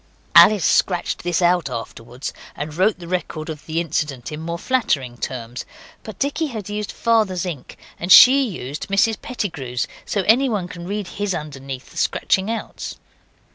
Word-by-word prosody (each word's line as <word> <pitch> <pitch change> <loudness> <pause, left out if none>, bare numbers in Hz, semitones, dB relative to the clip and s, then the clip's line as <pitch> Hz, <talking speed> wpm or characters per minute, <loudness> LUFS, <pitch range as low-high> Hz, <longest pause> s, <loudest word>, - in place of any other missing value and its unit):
Alice 205 -7 +7
scratched 180 -2 +1
this 175 0 0
out 175 -3 +3
afterwards 120 +1 -6 0.2
and 150 +1 -5
wrote 190 +5 +2
the 175 -2 -10
record 170 -3 -3
of 150 -1 -10
the 160 +1 -1
incident 150 -6 -2
in 150 - -5
more 170 +1 -4
flattering 145 - 0
terms. 120 0 -5 0.4
But 215 -4 -9
Dicky 290 +3 -1
had 220 -7 -6
used 210 0 -3
Father's 215 -6 +1
ink, 155 -8 -7 0.2
and 175 +2 -2
she 260 +6 +10
used 145 -6 -6
Mrs 200 +3 +2
Pettigrew's, 140 - -3 0.2
so 200 - -1
anyone 220 -3 +2
can 175 -1 -9
read 205 +1 -3
his 205 -2 -2
underneath 135 -4 -7
the - - -14
scratching 190 +2 +1
outs. 230 0 -5
175 Hz, 160 wpm, -21 LUFS, 145-210 Hz, 0.4 s, she